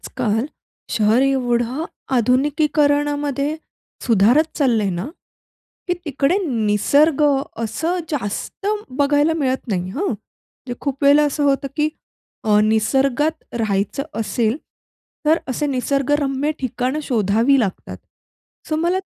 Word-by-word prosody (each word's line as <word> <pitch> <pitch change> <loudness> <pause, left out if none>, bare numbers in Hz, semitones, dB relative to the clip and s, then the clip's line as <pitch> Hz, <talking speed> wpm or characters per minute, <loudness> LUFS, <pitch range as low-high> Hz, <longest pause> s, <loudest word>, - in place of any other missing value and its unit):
आजकाल 225 -1 -1 0.4
शहर 220 +3 +3
एवढं 255 0 0 0.3
आधुनिकीकरणामध्ये 290 +2 +1 0.5
सुधारत 235 +6 +4
चाललंय 235 -9 +2
ना, 175 +2 -3 0.8
की 355 - +2
तिकडे 295 +4 +1
निसर्ग 270 - +2 0.4
असं 320 +11 -1
जास्त 280 - -4 0.3
बघायला 290 +2 +3
मिळत 265 -3 -1
नाही 185 -3 -2
हं. 315 - -2
म्हणजे 245 - -8
खूप 275 0 -4
वेळेला 285 +1 +6
असं 290 - -2
होतं, 275 0 +1
की 300 0 +2 0.6
अ, 210 -1 +4
निसर्गात 270 +8 +1
राहायचं 210 +4 -1 0.2
असेल 220 +3 0 0.7
तर 320 +2 +4
असे 265 +3 -1
निसर्गरम्य 275 +1 0
ठिकाणं 255 +3 -2
शोधावी 230 +1 +2
लागतात. 200 -5 -3 0.7
सो 310 - 0
मला 345 +4 +1
270 Hz, 105 wpm, -20 LUFS, 225-290 Hz, 0.8 s, वेळेला